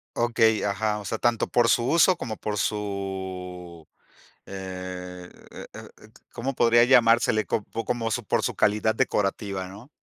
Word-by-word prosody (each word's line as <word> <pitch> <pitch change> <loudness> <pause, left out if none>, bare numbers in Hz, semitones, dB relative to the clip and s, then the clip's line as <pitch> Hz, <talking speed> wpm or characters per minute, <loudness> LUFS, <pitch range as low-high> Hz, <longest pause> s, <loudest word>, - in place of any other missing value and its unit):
Okey, 115 -2 +2
ajá, 105 +1 -1
o 105 - -10
sea, 110 - -3
tanto 120 0 +1
por 120 -1 +2
su 120 +1 +2
uso 170 +3 +5
como 110 -3 -5
por 105 -1 -3
su 95 -4 -5 0.6
eh 90 -1 -7 0.2
eh - - -10
eh - - -10
et - - -17 0.2
¿cómo 135 +3 -4
podría 120 0 +5
llamársele? 115 -3 +4
¿Cop 105 - -2 0.2
como 115 -1 -2 0.2
por - - +1
su - - -1
calidad 105 +1 +1
decorativa, 100 -5 -1
no? 100 +8 -12
105 Hz, 150 wpm, -25 LUFS, 95-115 Hz, 0.6 s, uso